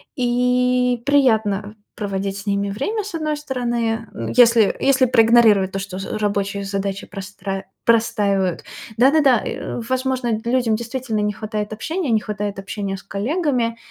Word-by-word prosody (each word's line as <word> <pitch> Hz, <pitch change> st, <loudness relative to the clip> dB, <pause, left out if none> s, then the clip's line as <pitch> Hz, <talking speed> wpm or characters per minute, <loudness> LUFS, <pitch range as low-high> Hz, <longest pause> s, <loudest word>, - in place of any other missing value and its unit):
и 250 Hz, -1 st, +1 dB
приятно 220 Hz, -7 st, +2 dB, 0.2 s
проводить 195 Hz, -1 st, -3 dB
с 195 Hz, -, -10 dB
ними 200 Hz, 0 st, 0 dB
время, 410 Hz, -, -2 dB
с 420 Hz, -, -8 dB
одной 305 Hz, -2 st, -2 dB
стороны, 235 Hz, -5 st, -2 dB
м, -, -, -4 dB
если 235 Hz, -4 st, +5 dB
если 270 Hz, -1 st, +3 dB
проигнорировать 225 Hz, -5 st, +5 dB
то, 195 Hz, -, -2 dB
что 190 Hz, -1 st, -6 dB
з 195 Hz, -, -4 dB
рабочие 200 Hz, -1 st, -1 dB
задачи 195 Hz, 0 st, -3 dB
простра 195 Hz, -1 st, -6 dB, 0.2 s
простаивают. 200 Hz, -5 st, +1 dB, 0.3 s
Да-да-да, 270 Hz, -1 st, +4 dB
э, -, -, -4 dB
возможно, 260 Hz, -2 st, 0 dB
людям 240 Hz, -2 st, +1 dB
действительно 235 Hz, -1 st, -3 dB
не 210 Hz, 0 st, 0 dB
хватает 215 Hz, 0 st, -4 dB
общения, 320 Hz, -, -3 dB
не 220 Hz, -1 st, +3 dB
хватает 205 Hz, -1 st, -4 dB
общения 195 Hz, 0 st, -4 dB
с -, -, -13 dB
коллегами, 235 Hz, -, -1 dB
225 Hz, 140 wpm, -21 LUFS, 200-250 Hz, 0.3 s, если